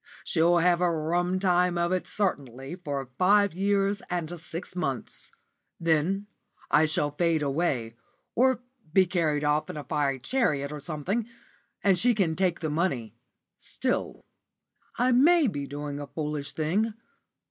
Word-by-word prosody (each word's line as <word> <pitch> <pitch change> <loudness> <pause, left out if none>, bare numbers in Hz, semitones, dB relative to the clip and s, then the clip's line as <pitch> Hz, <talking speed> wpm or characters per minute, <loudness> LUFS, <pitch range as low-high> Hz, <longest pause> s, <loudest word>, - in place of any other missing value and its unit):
She'll 170 +1 +3
have 175 +1 +3
a 180 - +4
rum 175 +3 0
time 180 -2 +2
of 170 +1 +1
it 185 -1 -1
certainly 135 - -2
for 140 -7 -5
five 200 +1 +4
years 200 +2 +1
and 175 -1 -3
six 170 +1 -7
months; 135 -10 -3 0.5
then 170 +5 +1 0.5
I 150 +1 +5
shall 150 -1 +1
fade 160 0 +1
away, 135 -6 -1 0.4
or 255 0 +2 0.3
be 190 +2 +5
carried 165 -5 0
off 150 +1 +1
in - - -6
a 150 - -5
fiery 140 -2 0
chariot 140 - 0
or 150 - -5
something, 170 +10 -3 0.6
and 195 -3 +4
she 240 +4 +4
can 175 -6 +1
take 180 -2 0
the 160 - -1
money. 140 - -1 0.5
Still, - - -3 0.7
I 250 +2 +3
may 310 +6 +5
be 145 - -2
doing 145 0 -5
a 145 - -6
foolish 150 -2 -4
thing. 200 +8 0
170 Hz, 145 wpm, -27 LUFS, 150-190 Hz, 0.7 s, I